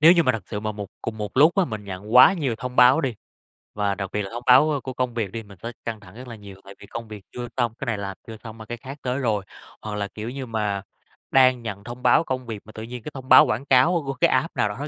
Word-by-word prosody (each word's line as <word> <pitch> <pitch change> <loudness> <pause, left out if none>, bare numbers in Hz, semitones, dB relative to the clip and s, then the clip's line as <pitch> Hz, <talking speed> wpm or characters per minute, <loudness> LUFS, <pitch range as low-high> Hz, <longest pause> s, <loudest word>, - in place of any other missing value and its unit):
Nếu 160 +3 +8
như 170 -2 +4
mà 130 - +2
thật 110 -4 -4
sự 105 - -4
mà 110 0 -3
một 105 -1 -6 0.2
cùng 110 - -5
một 105 +1 -5
lúc 155 +5 +6
á 195 - +5
mình 110 -8 -6
nhận 100 +3 -7
quá 125 +9 +9
nhiều 145 -10 -1
thông 125 0 -6
báo 125 +5 +7
đi, 135 -6 -2 0.6
và 100 -1 0
đặc 100 -1 -5
biệt 105 - -1
là 95 - -5
thông 120 +1 -6
báo, 130 +5 +6
ơ, 145 - 0
của 130 - -6
công 125 -1 -2
việc 110 -5 -2
đi, 115 +1 -6
mình 100 -2 -15
tới 115 - -5
căng 115 -2 -4
thẳng 95 -1 -16
rất 125 +2 -10
là 120 - -8
nhiều. 100 -2 -12
Tại 100 0 -12
vì 100 - -12
công 115 +2 -7
việc 105 -3 -10
chưa 120 0 -6
xong, 120 -3 +1
cái - - -4
này 120 -4 -1
làm 100 -1 -5
chưa 110 -1 -8
xong 115 -1 -9
mà 110 - -10
cái 120 +2 -6
khác 135 +4 -9
tới 125 +1 -2
rồi. 110 -7 0 0.4
Hoặc 110 -1 -5
là, 100 -1 -2
kiểu 105 +3 -7
như 135 +1 -6
mà, 105 -4 -2 0.5
đang 130 -2 +5
nhận 105 -3 -6
thông 120 +2 -9
báo 125 +6 +5
công 130 -4 -4
việc 110 -3 -6
mà 110 - -12
tự 110 - -8
nhiên 120 0 -8
cái 150 - -7
thông 130 -1 -9
báo - - +9
quảng 115 +6 -2
cáo 145 +6 +4
của 135 - -2
cái 130 - +2
app 130 +6 0
nào 105 - +1
đó 135 +8 -5
115 Hz, 305 wpm, -24 LUFS, 105-130 Hz, 0.6 s, quá